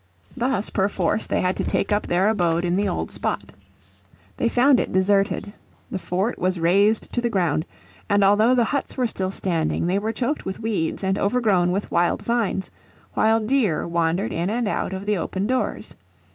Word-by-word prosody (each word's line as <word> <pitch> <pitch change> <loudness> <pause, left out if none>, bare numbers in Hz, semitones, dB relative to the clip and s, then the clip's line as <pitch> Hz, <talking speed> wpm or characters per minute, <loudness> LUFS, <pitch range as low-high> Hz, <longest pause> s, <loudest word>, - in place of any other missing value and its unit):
Thus 245 -5 -1
perforce 195 0 0
they - - 0
had 180 +1 0
to - - -1
take 200 - -1
up 205 0 +1
their 180 +3 +2
abode 175 -5 +1
in 175 0 +1
the 200 +1 +1
old 175 - -3
spot. - - -3 0.9
They 235 - +1
found 250 +2 +4
it - - -2
deserted. 195 +2 +1 0.4
The 190 - -3
fort 190 +6 -2
was 185 0 0
razed 200 +6 +2
to 240 - 0
the 240 - 0
ground, 175 -6 0 0.4
and 205 0 +3
although 215 +5 +4
the 245 - +4
huts 280 +5 -2
were 255 - +1
still 190 -5 -2
standing 170 -5 -1
they 185 +3 +1
were 220 +2 -2
choked 250 +6 -2
with 190 - -5
weeds 205 -6 -2
and 190 +1 0
overgrown 200 -5 +2
with 195 +3 -3
wild 175 0 +1
vines, 230 -5 -1 0.4
while 220 +1 +3
deer 215 - +1
wandered 170 +4 0
in 170 +3 -1
and 235 +1 -1
out 205 - -2
of 190 +1 -5
the 210 -1 +1
open 190 +3 -2
doors. 255 +3 -2
200 Hz, 185 wpm, -23 LUFS, 180-225 Hz, 0.9 s, found